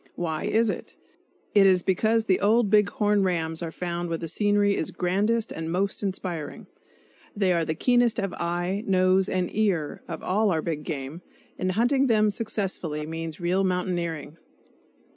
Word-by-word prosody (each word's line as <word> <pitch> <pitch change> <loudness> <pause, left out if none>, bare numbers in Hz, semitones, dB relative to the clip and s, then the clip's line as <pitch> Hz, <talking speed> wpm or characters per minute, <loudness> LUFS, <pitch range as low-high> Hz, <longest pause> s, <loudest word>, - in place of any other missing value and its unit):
Why 160 -3 -3
is 225 -1 +2
it? - - -8 0.6
It 200 -2 +6
is 185 -2 +4
because 220 +4 +2
the 185 -4 +2
old 215 0 +3
big 210 -1 +5
horn 210 -1 +1
rams 165 -3 -1
are 165 -1 -4
found 175 0 -4
where 165 - -1
the 165 - -5
scenery 205 +3 +2
is 160 - -2
grandest 210 +6 0
and 160 0 -4
most 195 +3 -1
inspiring; 185 -6 -4 0.7
they 195 -3 +2
are 170 -1 +1
the 155 0 -2
keenest 245 +4 +3
of 195 -2 -2
eye, 175 +4 -2
nose 185 0 +3
and 185 -1 -2
ear 190 -9 0
of - - -6
all 210 +3 +1
our 160 -4 0
big 155 -3 -3
game, 145 +2 -5 0.4
and 185 0 0
hunting 260 +6 +2
them 215 -3 +3
successfully 195 -8 -3
means 160 0 -6
real 180 +2 +1
mountaineering. 175 -4 -2
185 Hz, 165 wpm, -26 LUFS, 165-205 Hz, 0.7 s, It